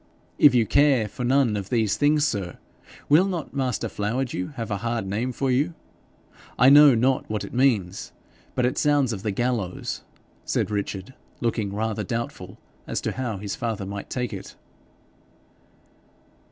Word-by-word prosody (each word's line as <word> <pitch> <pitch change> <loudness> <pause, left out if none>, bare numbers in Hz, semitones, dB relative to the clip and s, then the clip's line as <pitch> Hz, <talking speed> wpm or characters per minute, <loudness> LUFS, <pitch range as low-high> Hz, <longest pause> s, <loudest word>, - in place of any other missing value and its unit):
'If 145 -4 +7
you 115 -2 +4
care 140 -4 +3
for 125 +5 -7
none 125 -3 +3
of 100 -2 -4
these 115 -5 +1
things, 150 +1 +3
sir, 100 -8 -3 0.5
will 165 +7 +5
not 175 -6 -4
master 130 -4 -1
Flowerdew 115 +1 -3
have 115 -3 -5
a 100 - 0
hard 115 0 -2
name 110 +6 -2
for 130 +1 -1
you? 145 +7 +1 0.8
I 125 +3 +7
know 145 -2 +8
not 130 +3 +1
what 105 -1 -2
it - - -8
means, 115 -8 +1 0.4
but 125 - +2
it 125 - 0
sounds 145 -5 +2
of 95 - -5
the 105 - -2
gallows,' 110 -3 -2 0.4
said - - -1
Richard, 100 +2 -4 0.3
looking 110 -4 -1
rather 110 +1 -2
doubtful 115 +4 -5 0.3
as - - -2
to - - -2
how 120 -5 -3
his 100 0 -5
father 110 -4 -3
might 100 +1 -6
take 125 -3 -3
it. 95 - -8
120 Hz, 160 wpm, -24 LUFS, 105-135 Hz, 0.8 s, know